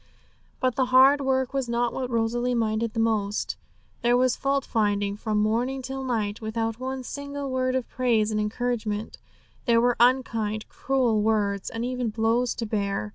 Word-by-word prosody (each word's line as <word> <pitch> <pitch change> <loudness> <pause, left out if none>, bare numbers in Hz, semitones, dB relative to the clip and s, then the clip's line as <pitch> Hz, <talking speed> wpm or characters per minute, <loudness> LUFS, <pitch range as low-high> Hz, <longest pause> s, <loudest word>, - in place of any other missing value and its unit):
But 255 -2 0
the 260 - +3
hard 265 +3 +6
work 265 -1 0
was 270 -3 -1
not 235 0 0
what 255 -1 -3
Rosalie 240 +1 0
minded 225 0 -1
most. 215 -2 0 0.5
There 240 +1 +3
was 255 0 +3
fault 275 0 0
finding 205 -2 0
from 215 0 -2
morning 240 +5 0
till 265 +1 -5
night, 220 -5 -2
without 225 +1 -2
one 260 0 -4
single 285 +1 -5
word 255 0 0
of 260 -2 -1
praise 230 -4 +1
and 215 - 0
encouragement; 215 -1 -2 0.5
there 235 -3 +4
were 245 0 +3
unkind, 230 -4 +2
cruel 250 -5 +1
words, 205 -2 0
and 230 +1 -4
even 250 -2 -2
blows 230 +3 +1
to 230 - -3
bear. 200 - -2
235 Hz, 165 wpm, -26 LUFS, 215-255 Hz, 0.5 s, hard